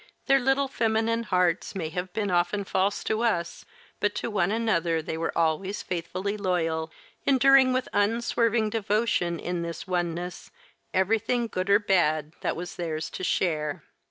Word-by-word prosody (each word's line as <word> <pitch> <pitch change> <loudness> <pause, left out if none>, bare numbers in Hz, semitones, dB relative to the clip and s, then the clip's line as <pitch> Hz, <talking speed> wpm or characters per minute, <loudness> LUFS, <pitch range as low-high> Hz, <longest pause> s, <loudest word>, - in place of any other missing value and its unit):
Their 275 -1 +5
little 270 +2 +2
feminine 225 -2 0
hearts 180 -5 0
may 165 -5 -3
have 180 +2 -4
been 205 0 -2
often 180 +3 +1
false 195 +1 0
to 220 +1 -1
us, 170 -8 -1 0.3
but 205 0 0
to 235 - -3
one 195 -3 +1
another 175 -8 +1
they 160 0 -4
were 165 +1 -3
always 170 +5 0
faithfully 185 +4 -3
loyal, 165 -5 -1 0.4
enduring 270 -1 +6
with 255 0 0
unswerving 225 +1 +1
devotion 210 -5 0
in 175 -1 -3
this 170 0 -5
oneness 175 -1 -3 0.4
everything 225 +5 +1
good 185 -4 -3
or 200 - +7
bad 155 -7 +1
that - - -1
was 175 +2 -7
theirs 160 -2 -3
to - - -6
share. 155 -5 0
190 Hz, 155 wpm, -27 LUFS, 170-225 Hz, 0.4 s, or